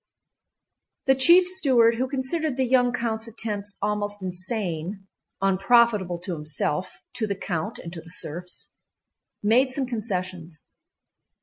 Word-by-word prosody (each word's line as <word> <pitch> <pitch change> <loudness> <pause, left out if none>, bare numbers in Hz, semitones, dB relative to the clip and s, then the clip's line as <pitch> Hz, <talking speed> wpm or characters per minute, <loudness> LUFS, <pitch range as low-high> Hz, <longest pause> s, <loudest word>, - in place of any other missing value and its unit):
The 265 - +5
chief 340 +8 +6
steward, 265 -11 +4
who 260 +2 0
considered 275 +2 0
the 260 - +2
young 245 0 +3
count's 230 -2 -2
attempts 205 -3 -4
almost 205 -1 -1
insane—unprofitable 195 +2 0
to 185 -1 -4
himself, 155 +2 -3
to 220 - -1
the 200 - -2
count, 170 -4 -3
and 170 - -8
to 165 - -7
the 165 - -15
serfs—made 185 - -3
some 265 +1 -1
concessions. 185 -8 -4
210 Hz, 115 wpm, -25 LUFS, 185-245 Hz, -, chief